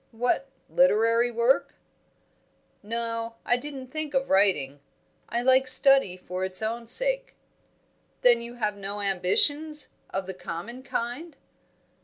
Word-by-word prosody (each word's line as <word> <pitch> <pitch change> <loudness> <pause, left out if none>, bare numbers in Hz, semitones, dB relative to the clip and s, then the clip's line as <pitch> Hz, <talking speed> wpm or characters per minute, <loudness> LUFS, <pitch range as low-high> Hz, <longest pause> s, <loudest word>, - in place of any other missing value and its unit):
"What, 245 +4 -1 0.2
literary 230 -1 +3
work?" 260 +4 +1 1.1
"No; 230 +1 -4
I 245 - +4
didn't 265 0 -7
think 310 -1 -4
of 270 0 0
writing. 165 -8 +2 0.5
I 235 +1 -2
like 260 +1 +4
study 270 -8 +6
for 185 0 -6
its 190 +2 0
own 230 +1 -4
sake." - - -1 0.9
"Then 240 -1 +5
you 235 +1 -8
have 215 -3 -2
no 200 +1 -6
ambitions, 290 - +1 0.2
of 190 0 -4
the 190 - -6
common 185 +8 -8
kind?" 270 +5 -5
235 Hz, 125 wpm, -26 LUFS, 205-270 Hz, 1.1 s, study